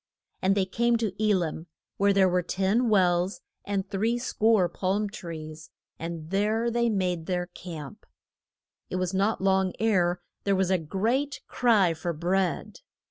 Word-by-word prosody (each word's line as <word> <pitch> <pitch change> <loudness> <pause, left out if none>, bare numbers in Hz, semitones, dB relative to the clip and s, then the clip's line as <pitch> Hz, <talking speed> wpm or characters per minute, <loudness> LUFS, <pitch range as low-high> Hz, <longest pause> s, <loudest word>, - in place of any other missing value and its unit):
And 190 +1 +3
they 190 - +2
came 235 +5 +1
to 220 -4 -2
E 210 -1 +4
lim, 165 -2 -3 0.3
where 200 -1 +4
were 180 0 +2
ten 195 +7 +1
wells 180 -2 +2 0.2
and 200 -1 -2
three 225 +5 0
score 220 -5 +2
palm 195 +4 -1
trees, 155 -5 -8 0.3
and 165 0 -6
there 215 +4 +1
they 235 0 +1
made 180 -5 -1
their 180 -1 -1
camp. 175 0 -9 0.8
It - - -4
was 185 0 -1
not 200 +3 +1
long 190 -1 +2
ere 180 -5 +2 0.2
there 200 -1 +2
was 190 0 +1
a 185 - +3
great 230 - -1
cry 215 -8 +3
for 170 +2 -3
bread. 180 +3 -1
190 Hz, 150 wpm, -27 LUFS, 175-215 Hz, 0.8 s, E